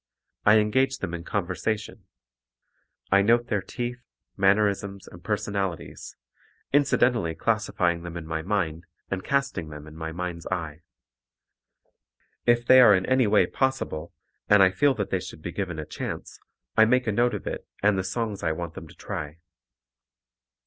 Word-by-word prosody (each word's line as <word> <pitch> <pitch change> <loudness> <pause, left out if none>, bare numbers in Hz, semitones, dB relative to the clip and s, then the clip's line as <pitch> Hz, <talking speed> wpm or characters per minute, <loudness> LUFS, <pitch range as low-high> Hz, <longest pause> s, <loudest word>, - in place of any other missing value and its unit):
I 105 +1 +8
engage 130 +5 +2
them 85 - -5
in 85 -1 -5
conversation. 100 +4 -3 1.1
I 100 +1 +6
note 120 +3 +3
their 105 -3 +1
teeth, 120 +4 -5 0.3
mannerisms 100 0 +1
and 85 0 -13
personalities, 100 -4 -3 0.6
incidentally 125 - +2
classifying 90 -6 0
them 85 0 -7
in 85 - -7
my 80 0 -3
mind 85 -3 -2 0.2
and 95 -1 -2
casting 140 - -1
them 75 0 -9
in 75 0 -12
my 80 0 -5
mind's 85 -1 -5
eye. 80 -4 -4 1.7
If 120 0 +4
they 130 +1 +8
are 105 -5 +8
in 95 0 0
any 130 -3 +3
way 105 0 +4
possible 130 - -2 0.4
and 105 -1 +7
I 95 - +5
feel 140 +8 +3
that 100 -4 -3
they 95 - +1
should 90 -4 -10
be 85 - -4
given 90 -3 -4
a 75 - -4
chance, - - -6 0.4
I 110 - +7
make 125 +2 +2
a 110 - +1
note 120 +3 +2
of - - -7
it - - -5 0.2
and 105 0 +4
the 95 - -1
songs 105 +2 -3
I 80 - 0
want 85 0 -5
them - - -9
to - - -16
try. 75 +1 -6
100 Hz, 165 wpm, -26 LUFS, 85-115 Hz, 1.7 s, I